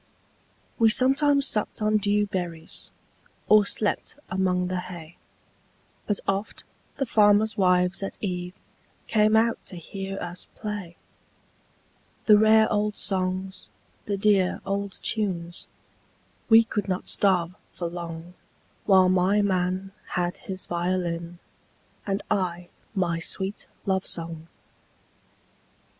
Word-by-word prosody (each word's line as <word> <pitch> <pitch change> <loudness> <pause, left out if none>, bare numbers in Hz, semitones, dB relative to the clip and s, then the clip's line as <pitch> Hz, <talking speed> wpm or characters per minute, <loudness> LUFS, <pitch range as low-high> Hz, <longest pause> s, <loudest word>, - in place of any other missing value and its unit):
We 225 -1 +6
sometimes 275 +4 +3
supped 210 -4 -1
on 215 0 +2
dew 205 0 +2
berries, 175 -4 -5 0.6
Or 210 -1 +6
slept 210 +6 -1
among 185 -1 +1
the 185 0 -2
hay, 170 -2 -9 0.9
But 205 - 0
oft 195 +2 -2 0.3
the 270 - -1
farmers' 215 -1 +4
wives 180 -1 +2
at 195 - -5
eveCame 200 +3 -1
out 230 +1 +1
to 185 - -8
hear 195 +3 -6
us 175 0 -6
play; 205 -6 -6 1.3
The 210 -2 +7
rare 220 0 +6
old 210 0 0
songs, 185 0 -2 0.4
the 200 -1 -1
dear 195 -2 +2
old 200 0 -2
tunes,—We 200 +3 -1
could 210 -2 -3
not 185 -1 -2
starve 180 -3 +2 0.2
for 175 - -4
longWhile 175 +2 -1
my 190 +3 +3
man 185 0 -1 0.2
had 175 0 -2
his 190 -5 +1
violin, 175 -1 -2 0.7
And 195 0 -1
I 180 -3 -1 0.3
my 170 -3 0
sweet 190 +4 -3 0.2
love 190 -2 0
song. 165 -1 -3
190 Hz, 110 wpm, -25 LUFS, 180-210 Hz, 1.3 s, The